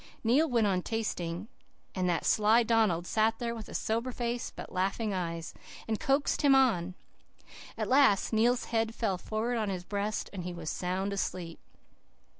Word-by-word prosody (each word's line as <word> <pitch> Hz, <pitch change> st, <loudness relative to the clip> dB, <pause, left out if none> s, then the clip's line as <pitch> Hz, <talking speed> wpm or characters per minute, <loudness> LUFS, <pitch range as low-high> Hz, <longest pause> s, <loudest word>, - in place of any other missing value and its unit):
"Neil 275 Hz, +8 st, +3 dB
went 235 Hz, -3 st, +2 dB
on 190 Hz, -3 st, +1 dB
'tasting,' 185 Hz, -4 st, -3 dB, 0.5 s
and 185 Hz, -2 st, 0 dB
that 170 Hz, -, 0 dB
sly 220 Hz, +3 st, +4 dB
Donald 215 Hz, -7 st, +2 dB
sat 220 Hz, +3 st, +1 dB
there 235 Hz, -1 st, -2 dB
with 225 Hz, -2 st, -8 dB
a -, -, -8 dB
sober 230 Hz, +3 st, -1 dB
face, 240 Hz, 0 st, -3 dB
but -, -, -8 dB
laughing 195 Hz, +3 st, -1 dB
eyes, 170 Hz, -3 st, -4 dB, 0.3 s
and 220 Hz, -1 st, -1 dB
coaxed 280 Hz, -1 st, +1 dB
him 280 Hz, -2 st, +6 dB
on. 185 Hz, -10 st, +2 dB, 0.8 s
At -, -, -2 dB
last 255 Hz, -7 st, +4 dB
Neil's 235 Hz, +3 st, +3 dB
head 225 Hz, 0 st, +1 dB
fell 195 Hz, -6 st, -1 dB
forward 225 Hz, +5 st, -2 dB
on 215 Hz, -2 st, -1 dB
his 185 Hz, -2 st, -3 dB
breast, 205 Hz, +2 st, -2 dB
and 185 Hz, -3 st, -5 dB
he 180 Hz, 0 st, -5 dB
was 160 Hz, -2 st, -4 dB
sound 190 Hz, +2 st, -2 dB
asleep. 180 Hz, -4 st, -4 dB
215 Hz, 170 wpm, -30 LUFS, 185-235 Hz, 0.8 s, him